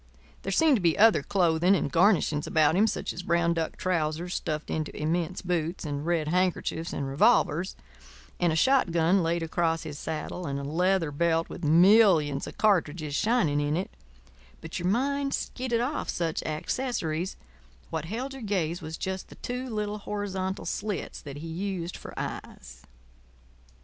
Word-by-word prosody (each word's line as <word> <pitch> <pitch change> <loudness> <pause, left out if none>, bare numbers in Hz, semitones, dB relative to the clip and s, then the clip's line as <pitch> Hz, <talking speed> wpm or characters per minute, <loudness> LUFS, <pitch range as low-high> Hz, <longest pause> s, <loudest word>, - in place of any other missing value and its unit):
There 195 - -4
seemed 300 +6 +4
to - - -4
be 170 -2 +2
other 220 -6 +6
clothing 175 +2 +3
and 145 -6 -1
garnishings 170 -4 +3
about 155 0 +3
him, 210 +4 +4
such - - -2
as 175 - -6
brown 170 -1 +2
duck 165 -1 -3
trousers 170 0 -1
stuffed 155 0 -3
into 155 -1 -3
immense 170 +4 -1
boots, 175 -1 -2
and 145 -1 -3
red 165 -3 +1
handkerchiefs 180 -1 0
and 140 - -3
revolvers; 150 +5 +2 0.6
and 175 -2 +2
a - - 0
shotgun 175 -5 +3
laid 170 0 0
across 165 0 0
his 145 -1 -7
saddle 160 +2 -4
and 140 0 -2
a - - -5
leather 170 +2 +1
belt 165 +2 +1
with - - -8
millions 165 -3 +5
of - - -9
cartridges 165 -7 +1
shining 170 -7 +2
in 145 +2 0
it—but 60 - -9
your 175 - -1
mind 275 +6 +1
skidded 245 -2 -2
off 275 +5 -2
such 165 -2 -1
accessories; 165 0 -2 0.6
what 160 -1 -3
held 245 +9 -4
your 270 - -9
gaze 180 -5 -1
was 160 0 -6
just 190 0 -4
the - - -12
two 250 +1 -5
little 210 -1 -3
horizontal 195 -2 -3
slits 205 -1 -4
that 140 -1 -8
he 160 +3 -7
used 180 0 -4
for - - -10
eyes. - - -7
170 Hz, 160 wpm, -27 LUFS, 155-195 Hz, 0.6 s, other